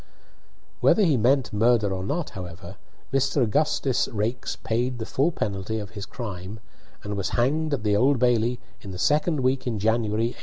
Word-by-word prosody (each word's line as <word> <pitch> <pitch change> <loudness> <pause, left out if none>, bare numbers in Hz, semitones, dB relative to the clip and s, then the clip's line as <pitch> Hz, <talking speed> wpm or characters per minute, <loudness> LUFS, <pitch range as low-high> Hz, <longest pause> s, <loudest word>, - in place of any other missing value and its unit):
Whether 215 - +4
he 160 -7 +4
meant 130 +2 +2
murder 110 -2 +3
or 95 0 -3
not, 150 - -2
however, 90 0 -8 0.4
Mr. 135 0 +2
Augustus 135 +2 +1
Raikes 110 +2 -2
paid 120 +2 -1
the 110 - -4
full 140 +9 +1
penalty 105 - -3
of 105 -2 -6
his 100 -2 -7
crime, 100 -2 -6 0.4
and 105 0 -4
was 100 -3 -2
hanged 150 +6 +1
at 115 - -8
the 105 -1 +2
Old 135 +6 +4
Bailey 120 0 +2 0.2
in 100 - -9
the 95 - -6
second 150 - +2
week 130 +1 0
in 115 -3 -1
January, 110 +1 +1
1857. - - -20
115 Hz, 180 wpm, -25 LUFS, 105-130 Hz, 0.4 s, Whether